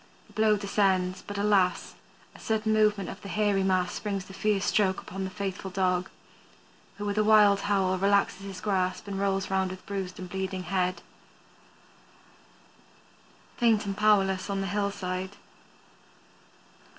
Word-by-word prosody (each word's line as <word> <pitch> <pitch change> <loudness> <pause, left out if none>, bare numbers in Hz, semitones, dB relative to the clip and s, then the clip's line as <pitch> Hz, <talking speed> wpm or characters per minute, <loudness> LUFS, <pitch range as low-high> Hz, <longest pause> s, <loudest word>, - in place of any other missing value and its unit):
The 210 - -22
blow 215 0 +3
descends, 190 -2 +1
but 205 - -7
alas! 200 -3 +1 0.4
a - - -15
sudden 220 0 0
movement 210 -3 +2
of 195 - -8
the 200 - -8
hairy 205 -2 +1
mass 185 -2 0
brings 200 -3 -3
the 190 - -12
fierce 195 +1 0
stroke 190 -3 +2
upon 195 +1 -6
the - - -4
faithful 190 0 -5
dog, 185 -1 0 0.9
who 205 - -5
with 205 +1 -1
a - - +4
wild 210 -2 +6
howl 195 -2 +1
relaxes 200 0 +2
his 195 -2 -8
grasp 190 -2 -1
and 195 -1 -4
rolls 195 -1 0
with 190 -1 -1
bruised 190 -2 -5
and 185 - -7
bleeding 190 0 -4
head, 180 -1 -1 2.5
faint 225 -3 +3
and 195 -1 -3
powerless 200 -2 +2
on 195 -1 -1
the - - -2
hillside. 195 -2 -3
195 Hz, 145 wpm, -28 LUFS, 185-205 Hz, 2.5 s, wild